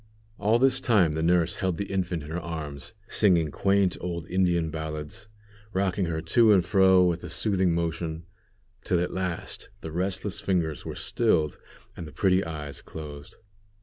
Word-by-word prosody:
All 110 +3 +3
this 130 +1 +4
time 100 -10 +3
the 80 +1 -2
nurse 85 0 +2
held 95 -3 -1
the 100 - -2
infant 90 -5 -2
in 75 - -9
her 85 - -2
arms, 75 -6 -6
singing 85 -7 +3
quaint 100 0 +2
old 85 -1 -4
Indian 85 -3 +1
ballads, 80 +3 -6 0.5
rocking 95 0 0
her 80 -1 -2
to 110 +6 +5
and 90 -3 +3
fro 95 0 +5
with 85 -1 0
a - - -6
soothing 95 -5 +1
motion, 80 -1 -3 0.6
till 90 - +1
at 90 - -2
last 90 -3 -4
the 80 - -6
restless 95 +3 -2
fingers 85 -5 -1
were - - -5
stilled 85 -11 +1 0.4
and 85 - -7
the - - -10
pretty 95 +2 +2
eyes 75 -3 -6
closed. 75 -2 -9
85 Hz, 165 wpm, -26 LUFS, 80-95 Hz, 0.6 s, to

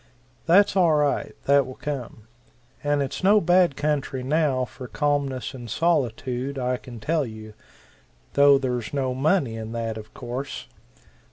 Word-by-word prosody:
That's 195 +5 +5
all 170 -5 +4
right 150 -1 0
that 140 -1 +4
will 130 - -8
come. 135 -6 -6 0.6
And 145 -1 +1
it's 135 - -5
no 205 +3 +6
bad 175 -4 +3
country 145 -3 -1
now 140 -2 +1
for 125 0 -10
calmness 140 -3 -1
and 120 -3 -9
solitude, 135 -3 -1
I 125 -1 -1
can 120 -2 -11
tell 155 +6 0
you 110 -3 -9 0.8
though 140 0 +6
there's 125 -2 -3
no 130 -2 0
money 135 -2 +1
in 110 0 -6
that, 115 -1 -3
of 105 - -12
course. 130 +2 -5
135 Hz, 150 wpm, -24 LUFS, 125-150 Hz, 0.8 s, no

